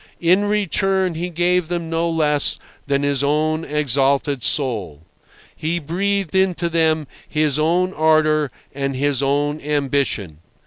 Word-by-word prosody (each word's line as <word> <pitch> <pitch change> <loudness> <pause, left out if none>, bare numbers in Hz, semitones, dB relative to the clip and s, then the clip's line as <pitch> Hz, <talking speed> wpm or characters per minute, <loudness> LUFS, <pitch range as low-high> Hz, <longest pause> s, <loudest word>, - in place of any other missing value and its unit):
In 180 +4 +3
return 195 -2 +1
he 170 +3 -4
gave 175 0 +1
them 170 -1 -3
no 165 +1 0
less 150 -3 +1 0.3
than 140 0 0
his 140 -1 +1
own 155 +2 +1
exalted 140 -2 0
soul. 105 - -1 0.5
He 165 +3 -2
breathed 190 +3 -1
into 180 -3 +1
them 160 -2 +1 0.2
his 150 -1 +1
own 180 +4 +1
ardour 155 -2 +2 0.2
and 135 -1 -3
his 140 0 0
own 145 +2 0
ambition. 140 - -1
155 Hz, 130 wpm, -20 LUFS, 140-170 Hz, 0.5 s, In